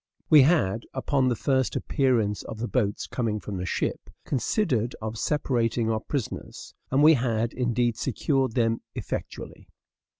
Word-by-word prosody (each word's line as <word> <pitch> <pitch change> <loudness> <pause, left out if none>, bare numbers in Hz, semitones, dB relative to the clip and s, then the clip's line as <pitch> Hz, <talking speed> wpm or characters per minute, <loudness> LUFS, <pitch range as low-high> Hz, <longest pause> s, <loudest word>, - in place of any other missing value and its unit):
We 150 -2 +9
had, 130 - +2
upon 130 0 +1
the 125 - +2
first 130 +2 0
appearance 120 -8 +1
of 110 - -8
the 120 +2 -3
boat's 105 -6 -1
coming 110 -4 -2
from 100 -1 -6
the 90 0 -4
ship, - - -2 0.2
considered 125 - 0
of 110 +1 -5
separating 115 -6 0
our 110 - 0
prisoners; 130 +1 -5 0.2
and 135 +3 +3
we 160 +1 +8
had, 115 -3 0
indeed, 120 -2 0
secured 135 0 0
them 115 -2 +1
effectually. - - -6
120 Hz, 145 wpm, -26 LUFS, 110-135 Hz, 0.2 s, We